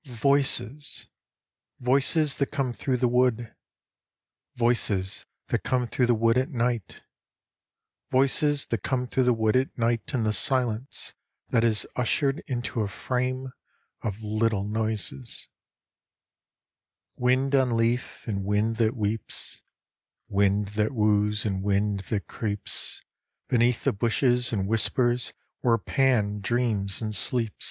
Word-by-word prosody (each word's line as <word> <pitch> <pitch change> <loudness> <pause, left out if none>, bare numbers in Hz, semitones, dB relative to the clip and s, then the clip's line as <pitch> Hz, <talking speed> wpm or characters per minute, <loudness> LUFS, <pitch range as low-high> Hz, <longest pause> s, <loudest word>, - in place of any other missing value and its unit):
Voices! 140 +1 +2 0.7
Voices 140 +4 +3
that 140 - +1
come 135 -4 -2
through 125 +4 -1
the 125 0 +2
wood, 120 -2 +1 1.0
Voices 110 -6 0 0.2
that - - +1
come 125 -1 0
through 120 +1 0
the 120 - +4
wood 115 +2 +3
at 130 - -1
night, 120 -4 -2 1.1
Voices 140 +2 +2
that 115 -4 -2
come 125 +2 -1
through 130 +1 0
the 125 - +4
wood 110 -1 +1
at 130 +1 0
night 115 -1 0
in 125 -5 0
the 110 -1 +1
silence 125 +4 0 0.4
That 115 -2 +2
is 110 -3 +2
ushered 135 +4 0
into 120 -3 -2
a 105 - 0
frame 130 +4 -3 0.5
Of 110 0 -4
little 110 -1 0
noises: 105 - -3 1.7
Wind 130 +2 +1
on 130 -4 +3
leaf, 120 +2 -1
and 100 -3 -2
wind 105 +3 0
that 115 +1 +1
weeps, 105 0 -4 0.7
Wind 100 0 +1
that 105 +3 -1
woos, 105 -1 +2
and 95 -3 -1
wind 100 +1 +1
that 105 -3 -1
creeps 105 -2 -4 0.5
Beneath 120 0 +2
the - - +2
bushes 120 +3 +2
and 100 -4 -1
whispers 120 +3 +1 0.3
where 115 -2 +3
Pan 115 -4 +1
dreams 105 -2 0
and 110 -1 -3
sleeps. 115 +2 +1
115 Hz, 130 wpm, -26 LUFS, 105-125 Hz, 1.7 s, the